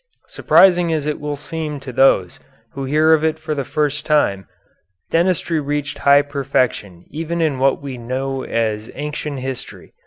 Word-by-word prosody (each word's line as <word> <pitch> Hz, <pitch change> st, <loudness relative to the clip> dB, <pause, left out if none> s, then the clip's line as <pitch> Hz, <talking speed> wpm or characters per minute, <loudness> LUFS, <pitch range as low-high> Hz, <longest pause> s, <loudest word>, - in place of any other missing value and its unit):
Surprising 175 Hz, -3 st, +4 dB
as 155 Hz, -3 st, -1 dB
it 150 Hz, 0 st, -2 dB
will 150 Hz, 0 st, -3 dB
seem 155 Hz, -1 st, -5 dB
to 135 Hz, -2 st, -9 dB
those 105 Hz, -9 st, +3 dB, 0.3 s
who 135 Hz, -1 st, -5 dB
hear 155 Hz, +4 st, +4 dB
of 155 Hz, -1 st, +2 dB
it 160 Hz, 0 st, +1 dB
for 155 Hz, 0 st, -4 dB
the 140 Hz, -2 st, -2 dB
first 150 Hz, +2 st, -1 dB
time, 100 Hz, -, +1 dB, 0.6 s
dentistry 170 Hz, -1 st, +1 dB
reached 145 Hz, 0 st, -3 dB
high 140 Hz, 0 st, +5 dB
perfection 130 Hz, -, -2 dB
even 165 Hz, +2 st, -3 dB
in 155 Hz, -5 st, 0 dB
what 135 Hz, +1 st, +1 dB
we 135 Hz, -3 st, -6 dB
know 130 Hz, +3 st, -3 dB
as 110 Hz, -1 st, -2 dB
ancient 150 Hz, 0 st, -4 dB
history. 130 Hz, -1 st, -7 dB
145 Hz, 160 wpm, -19 LUFS, 130-155 Hz, 0.6 s, high